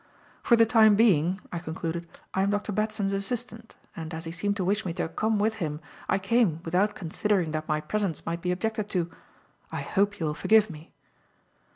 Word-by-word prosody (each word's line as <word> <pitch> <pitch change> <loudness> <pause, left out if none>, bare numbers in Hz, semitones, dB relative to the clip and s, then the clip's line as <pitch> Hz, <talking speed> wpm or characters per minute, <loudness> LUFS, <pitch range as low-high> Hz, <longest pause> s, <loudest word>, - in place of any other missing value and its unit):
"For 235 - +5
the 230 0 +6
time 220 -2 +6
being," 190 -4 +3
I 175 - -2
concluded, 165 0 -4 0.3
"I 190 - +1
am 195 - +2
Dr. 205 +1 -1
Batson's 215 -1 0
assistant, 225 +3 -4 0.2
and, 160 0 -6
as 165 +1 -5
he 165 - -4
seemed 200 +4 -1
to 185 - -1
wish 205 +3 +1
me 175 - -3
to 175 - -2
come 215 +6 0
with 220 +2 +1
him, 150 -2 -2 0.3
I - - +3
came 195 -4 +2
without 190 +5 +1
considering 180 0 0
that 155 0 -3
my 155 -1 0
presence 200 -2 -2
might 170 +1 -3
be 180 - 0
objected 215 +3 -2
to. 175 -4 -1 0.6
I - - -3
hope 205 0 0
you 165 - -1
will 150 - 0
forgive 215 +4 +4
me." 155 0 -12
195 Hz, 200 wpm, -27 LUFS, 165-215 Hz, 0.6 s, the